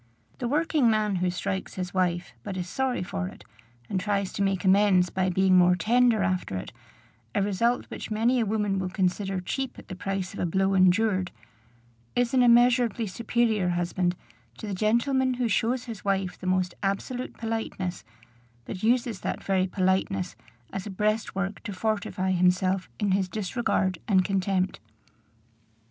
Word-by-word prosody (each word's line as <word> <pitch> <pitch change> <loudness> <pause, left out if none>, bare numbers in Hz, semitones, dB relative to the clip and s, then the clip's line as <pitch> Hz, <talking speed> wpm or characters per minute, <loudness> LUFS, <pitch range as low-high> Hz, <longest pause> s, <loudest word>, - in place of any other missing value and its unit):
The 245 - -2
working 295 -2 +2
man 215 -3 +1
who 180 0 +1
strikes 190 +2 -3
his 180 -1 -4
wife, 180 -2 0
but 195 -2 -5
is 180 -1 -3
sorry 255 +1 -1
for 90 - -3
it, 95 - -11 0.4
and 190 - -1
tries 200 -1 -1
to - - -3
make 195 -1 0
amends 190 -2 +4
by 185 0 0
being 185 +1 +3
more 180 0 +6
tender 230 +3 +3
after 185 - -1
it, 95 - -7 0.6
a - - +2
result 230 +5 +1
which - - -6
many 230 +4 +2
a 230 - +1
woman 205 -2 0
will 185 -1 -2
consider 190 +1 -1
cheap 260 +8 -4
at - - -13
the 185 - -5
price 195 0 -3
of - - -8
a - - 0
blow 190 +3 +1
endured, 185 0 +3 0.9
is 245 0 +1
an 260 - +4
immeasurably 240 -1 +4
superior 220 -1 0
husband 175 +1 0 0.4
to - - -7
the 205 - -4
gentleman 250 +6 +1
who 245 -1 0
shows 235 +4 +1
his 225 -5 -8
wife 195 -2 0
the 185 - -8
most 185 -1 +1
absolute 225 +6 -3
politeness, 225 -5 -3 0.6
but 185 - -6
uses 235 -2 +1
that - - -4
very 190 -1 +1
politeness 190 0 0 0.4
as 195 +1 -4
a - - -5
breastwork 205 -1 -1
to 210 - -6
fortify 195 -2 -1
himself 185 +1 +2
in 205 -3 +1
his 190 -1 +1
disregard 200 -2 -1
and 190 -4 +3
contempt. 190 -1 0
195 Hz, 165 wpm, -27 LUFS, 185-225 Hz, 0.9 s, more